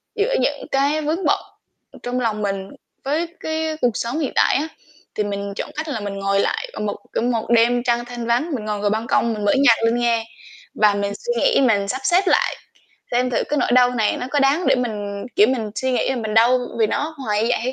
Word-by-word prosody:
giữa 445 Hz, +4 st, 0 dB
những -, -, -1 dB
cái 285 Hz, +3 st, +1 dB
vướng 315 Hz, +5 st, -2 dB
bận, -, -, +3 dB, 0.5 s
ừ, -, -, -14 dB
trong 250 Hz, +1 st, -2 dB
lòng 220 Hz, -3 st, -1 dB
mình 195 Hz, -1 st, -3 dB, 0.3 s
với 310 Hz, +5 st, -1 dB
cái 315 Hz, 0 st, -2 dB
cuộc 240 Hz, -4 st, +1 dB
sống 240 Hz, +7 st, -2 dB
hiện 285 Hz, -, -1 dB
tại -, -, +4 dB
á, 300 Hz, +4 st, 0 dB, 0.5 s
thì 210 Hz, -, 0 dB
mình 200 Hz, 0 st, -4 dB
chọn -, -, -4 dB
cách 310 Hz, +1 st, -4 dB
là 260 Hz, -7 st, -3 dB
mình 205 Hz, -1 st, -5 dB
ngồi 195 Hz, 0 st, +1 dB
lại -, -, -1 dB
ở -, -, -7 dB
một 210 Hz, -1 st, -2 dB, 0.2 s
ở -, -, 0 dB
một 235 Hz, -2 st, -1 dB
đêm 240 Hz, +1 st, +3 dB
trăng 240 Hz, -1 st, 0 dB
thanh 240 Hz, -1 st, -6 dB
vắng, 250 Hz, +8 st, +1 dB
mình 215 Hz, -3 st, -5 dB
ngồi 210 Hz, -1 st, -2 dB
ngồi 205 Hz, 0 st, +1 dB
ban 220 Hz, +3 st, -2 dB
công 235 Hz, -2 st, +2 dB
mình 210 Hz, -1 st, -4 dB
mở 205 Hz, -, +4 dB
nhạc 230 Hz, -4 st, +5 dB
lên 230 Hz, +1 st, +2 dB
nghe 235 Hz, -2 st, +1 dB, 0.5 s
và 210 Hz, -1 st, +4 dB
mình 200 Hz, 0 st, -2 dB
suy 480 Hz, -, -4 dB
nghĩ -, -, +3 dB
mình 205 Hz, -6 st, +2 dB
sắp 260 Hz, +5 st, -3 dB
xếp 350 Hz, +7 st, +4 dB
lại, -, -, +2 dB, 0.6 s
xem 250 Hz, +1 st, +1 dB
thử -, -, +1 dB
cái 295 Hz, -, -1 dB
nỗi -, -, +1 dB
đau 250 Hz, 0 st, +5 dB
này 220 Hz, -3 st, +1 dB
nó 250 Hz, -, -4 dB
có 290 Hz, -, +1 dB
đáng 285 Hz, +6 st, +2 dB
để -, -, +5 dB
mình 205 Hz, -5 st, -3 dB
kiểu 210 Hz, -, +7 dB
mình 225 Hz, -5 st, -1 dB
suy 260 Hz, 0 st, -1 dB
nghĩ -, -, 0 dB
là 265 Hz, -, -1 dB
mình 220 Hz, -2 st, -3 dB
đau 240 Hz, +3 st, +5 dB, 0.2 s
vì 220 Hz, -, +4 dB
nó 305 Hz, +7 st, -2 dB
hoài 210 Hz, 0 st, 0 dB
như 230 Hz, -, +1 dB
vậy -, -, +2 dB
hay 255 Hz, +2 st, -1 dB
240 Hz, 250 wpm, -21 LUFS, 215-275 Hz, 0.6 s, kiểu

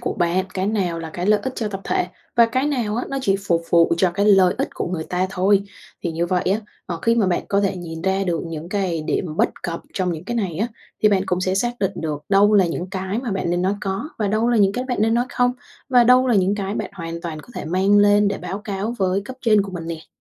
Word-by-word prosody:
của 240 Hz, -, -2 dB
bạn, 180 Hz, 0 st, +1 dB
cái 190 Hz, 0 st, -1 dB
nào 190 Hz, -6 st, 0 dB
là 165 Hz, -1 st, -6 dB
cái 175 Hz, +3 st, -4 dB
lợi 210 Hz, 0 st, +4 dB
ích 260 Hz, -, -3 dB
cho 220 Hz, -3 st, -2 dB
tập 195 Hz, -1 st, -5 dB
thể -, -, 0 dB, 0.3 s
và 235 Hz, -1 st, +7 dB
cái 260 Hz, +4 st, 0 dB
nào 235 Hz, -7 st, -1 dB
á, 245 Hz, -, -1 dB
nó 275 Hz, -, -2 dB
chỉ 195 Hz, -3 st, +2 dB
phục 170 Hz, -1 st, +2 dB
vụ 170 Hz, -1 st, +5 dB
cho 180 Hz, 0 st, +3 dB
cái 200 Hz, +3 st, 0 dB
lợi 195 Hz, -3 st, +5 dB
ích -, -, 0 dB
của -, -, -3 dB
người 170 Hz, -3 st, -3 dB
ta 180 Hz, +1 st, -1 dB
thôi. 195 Hz, +2 st, +3 dB, 0.4 s
Thì 170 Hz, -3 st, -2 dB
như 170 Hz, +2 st, -1 dB
vậy 180 Hz, 0 st, +1 dB
á, 215 Hz, -, 0 dB, 0.3 s
ờ, 170 Hz, -2 st, -4 dB
khi 230 Hz, -, +3 dB
mà 225 Hz, -4 st, +2 dB
bạn 180 Hz, -2 st, +1 dB
có 200 Hz, 0 st, +2 dB
thể 195 Hz, -1 st, 0 dB
nhìn 165 Hz, -2 st, -7 dB
ra 190 Hz, +1 st, +1 dB
được 170 Hz, -3 st, -1 dB
những 165 Hz, +1 st, -6 dB
cái 185 Hz, -5 st, -1 dB
điểm 155 Hz, +1 st, -2 dB
bất -, -, +3 dB
cập 170 Hz, -1 st, -3 dB
trong 180 Hz, -2 st, 0 dB
những 160 Hz, +2 st, -7 dB
cái 240 Hz, +3 st, -3 dB
này 185 Hz, -8 st, -2 dB
á, 220 Hz, -, +1 dB, 0.4 s
thì 215 Hz, -, +7 dB
bạn 195 Hz, -2 st, +2 dB
cũng 180 Hz, 0 st, 0 dB
sẽ 185 Hz, 0 st, 0 dB
xác 240 Hz, +4 st, -1 dB
định 195 Hz, -1 st, 0 dB
được 150 Hz, -3 st, -4 dB
đâu 205 Hz, +1 st, +5 dB
là 195 Hz, -3 st, +5 dB
những 175 Hz, +2 st, -4 dB
cái 190 Hz, +3 st, -3 dB
mà 245 Hz, -3 st, -3 dB
bạn 190 Hz, -3 st, -1 dB
nên 175 Hz, +1 st, 0 dB
nói 195 Hz, +2 st, +1 dB
có, 195 Hz, +9 st, -3 dB
và 210 Hz, -, 0 dB
đâu 220 Hz, +3 st, +1 dB
là 240 Hz, -, +3 dB
những 200 Hz, -2 st, +4 dB
cái 250 Hz, +3 st, -3 dB
bạn 250 Hz, -3 st, -3 dB
nên 225 Hz, +1 st, +3 dB
nói 240 Hz, +1 st, +2 dB
không, 245 Hz, 0 st, +1 dB, 0.4 s
và 245 Hz, -2 st, +5 dB
đâu 255 Hz, +2 st, +5 dB
là 245 Hz, -, +3 dB
những 195 Hz, +1 st, +3 dB
cái 200 Hz, 0 st, -3 dB
bạn -, -, -3 dB
hoàn 170 Hz, -2 st, -6 dB
toàn 160 Hz, -3 st, -5 dB
có -, -, -19 dB
thể -, -, -5 dB
mang 190 Hz, +5 st, +3 dB
lên 205 Hz, 0 st, +5 dB
để 200 Hz, -, -3 dB
báo 195 Hz, -, -5 dB
cáo 205 Hz, +2 st, -4 dB
với 190 Hz, 0 st, +1 dB
cấp 260 Hz, +2 st, -8 dB
trên 215 Hz, -4 st, +4 dB
của 195 Hz, -1 st, -8 dB
mình 165 Hz, -2 st, -6 dB
nè. 165 Hz, -1 st, -6 dB
195 Hz, 285 wpm, -21 LUFS, 175-215 Hz, 0.4 s, và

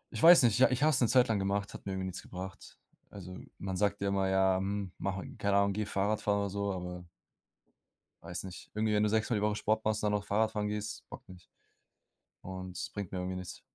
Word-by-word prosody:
Ich -, -, -3 dB
weiß 170 Hz, -2 st, +9 dB
nicht, 115 Hz, 0 st, +4 dB
ja, 130 Hz, -, +7 dB
ich 130 Hz, +3 st, 0 dB
habe 155 Hz, -, +5 dB
es 135 Hz, -, +2 dB
'ne 120 Hz, -, +5 dB
Zeit 125 Hz, +1 st, +5 dB
lang 110 Hz, -3 st, +1 dB
gemacht, 100 Hz, +1 st, -1 dB
hat -, -, -10 dB
mir 95 Hz, -, -2 dB
irgendwie 95 Hz, 0 st, -3 dB
nichts 95 Hz, -1 st, -5 dB
gebracht. 95 Hz, +1 st, -9 dB, 0.3 s
Also, 90 Hz, -2 st, -9 dB, 0.2 s
man 95 Hz, -1 st, -4 dB
sagt 100 Hz, +1 st, +1 dB
ja 100 Hz, 0 st, 0 dB
immer: 95 Hz, -1 st, +1 dB
„Ja, 95 Hz, 0 st, +3 dB
hm, 100 Hz, -1 st, -3 dB
mache 100 Hz, 0 st, -3 dB
keine 100 Hz, -1 st, +2 dB
Ahnung, 100 Hz, 0 st, +3 dB
gehe 105 Hz, 0 st, -2 dB
Fahrrad 105 Hz, +2 st, 0 dB
fahren.”, 100 Hz, -1 st, +1 dB
oder 100 Hz, -, -1 dB
so, 100 Hz, 0 st, -1 dB
aber 90 Hz, -1 st, -5 dB, 1.2 s
weiß 85 Hz, +1 st, -5 dB
nicht. 95 Hz, -2 st, -9 dB
Irgendwie, 110 Hz, 0 st, 0 dB
wenn 105 Hz, -, +3 dB
du 105 Hz, -, +3 dB
6 110 Hz, +1 st, +1 dB
Mal 120 Hz, -, +2 dB
die 105 Hz, -, 0 dB
Woche 105 Hz, 0 st, +1 dB
Sport 110 Hz, +1 st, 0 dB
machst, 110 Hz, 0 st, 0 dB
dann 105 Hz, -1 st, +1 dB
noch 105 Hz, 0 st, 0 dB
Fahrradfahren 105 Hz, 0 st, 0 dB
gehst, 105 Hz, 0 st, -4 dB
bockt -, -, -11 dB
nicht. 90 Hz, -2 st, -13 dB, 1.0 s
Und 95 Hz, -1 st, -7 dB
es -, -, -4 dB
bringt 100 Hz, -4 st, -6 dB
mir 95 Hz, -, -3 dB
irgendwie 90 Hz, 0 st, -3 dB
nichts. 90 Hz, 0 st, -8 dB
100 Hz, 240 wpm, -32 LUFS, 95-105 Hz, 1.2 s, weiß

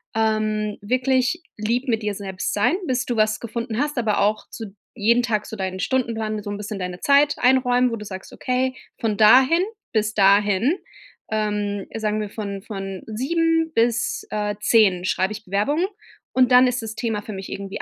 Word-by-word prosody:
ähm, 215 Hz, -1 st, 0 dB
wirklich 255 Hz, -, +1 dB
lieb 235 Hz, +5 st, -1 dB
mit 225 Hz, -2 st, +1 dB
dir 210 Hz, -1 st, -1 dB
selbst 190 Hz, -1 st, -4 dB
sein, 210 Hz, +11 st, +2 dB
bis 250 Hz, -1 st, 0 dB
du 240 Hz, -, -2 dB
was 215 Hz, 0 st, +2 dB
gefunden 230 Hz, 0 st, -4 dB
hast, 295 Hz, -2 st, -1 dB
aber 215 Hz, -3 st, +1 dB
auch 210 Hz, +1 st, 0 dB
zu 210 Hz, -4 st, -9 dB, 0.2 s
jeden 235 Hz, +2 st, +3 dB
Tag 215 Hz, -3 st, -1 dB
so 220 Hz, -, -7 dB
deinen 190 Hz, -1 st, -3 dB
Stundenplan, 225 Hz, -4 st, -1 dB
mit 210 Hz, -, -5 dB
so 205 Hz, -, -4 dB
'n 205 Hz, -, -4 dB
bisschen 210 Hz, -1 st, -6 dB
deine 180 Hz, -1 st, -5 dB
Zeit 285 Hz, +1 st, +4 dB
einräumen, 250 Hz, -1 st, +3 dB
wo -, -, -1 dB
du 210 Hz, -, -8 dB
sagst: 190 Hz, -1 st, -8 dB
„Okay, 255 Hz, +1 st, -1 dB, 0.2 s
von 220 Hz, -2 st, 0 dB
dahin 260 Hz, +10 st, +6 dB, 0.3 s
bis 215 Hz, -1 st, +1 dB
dahin, 205 Hz, -, +4 dB, 0.5 s
ähm, 210 Hz, -2 st, -1 dB
sagen 215 Hz, -1 st, -1 dB
wir 210 Hz, -, -4 dB
von 200 Hz, -2 st, -5 dB
von 195 Hz, -3 st, -6 dB
7 325 Hz, +7 st, 0 dB
bis, 235 Hz, +1 st, +1 dB
äh, 210 Hz, -1 st, -1 dB
10 195 Hz, -7 st, +3 dB
schreibe 190 Hz, +2 st, 0 dB
ich 215 Hz, 0 st, -9 dB
Bewerbungen 245 Hz, -, +1 dB, 0.5 s
und 255 Hz, 0 st, +3 dB
dann 250 Hz, +1 st, +7 dB
ist 250 Hz, -1 st, -1 dB
das 220 Hz, 0 st, -6 dB
Thema 220 Hz, -3 st, -2 dB
für 215 Hz, -, -7 dB
mich 190 Hz, 0 st, -7 dB
irgendwie 195 Hz, 0 st, -5 dB
215 Hz, 185 wpm, -22 LUFS, 205-250 Hz, 0.5 s, dann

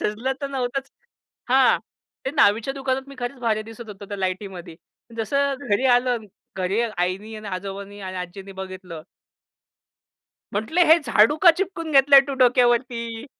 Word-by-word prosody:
सजलं 230 Hz, +6 st, -1 dB
तर 280 Hz, -, -2 dB
नव्हतंच. 265 Hz, 0 st, -3 dB, 0.6 s
हां. 260 Hz, 0 st, +4 dB, 0.5 s
ते 265 Hz, -, -1 dB
न्हावीच्या 230 Hz, -2 st, +2 dB
दुकानात 265 Hz, 0 st, -2 dB
मी 275 Hz, -, -10 dB
खरंच 245 Hz, +2 st, -5 dB
भारी 220 Hz, -3 st, 0 dB
दिसत 225 Hz, +1 st, -11 dB
होतो 205 Hz, -1 st, -9 dB
त्या 205 Hz, -, -5 dB
लाईटीमध्ये. 185 Hz, -3 st, -5 dB, 0.4 s
जसं 280 Hz, +5 st, 0 dB, 0.2 s
घरी 205 Hz, +6 st, +2 dB
आलो 250 Hz, +1 st, 0 dB
आणि 230 Hz, -3 st, -2 dB, 0.3 s
घरी 190 Hz, +4 st, 0 dB, 0.2 s
आईनी 190 Hz, +5 st, -2 dB
आणि 215 Hz, -1 st, -8 dB
आजोबांनी 200 Hz, +2 st, -6 dB
आणि 185 Hz, -1 st, -6 dB
आजींनी 185 Hz, +2 st, -7 dB
बघितलं. 185 Hz, -4 st, -9 dB, 1.5 s
म्हटले, 220 Hz, -, 0 dB
"हे 320 Hz, +2 st, +7 dB
झाडू 225 Hz, +3 st, +4 dB
का 345 Hz, -, +11 dB
चिपकून 360 Hz, -4 st, -3 dB
घेतलंय 275 Hz, 0 st, +7 dB
तू 280 Hz, -, -3 dB
डोक्यावरती?" 240 Hz, -1 st, +2 dB
225 Hz, 150 wpm, -23 LUFS, 195-265 Hz, 1.5 s, का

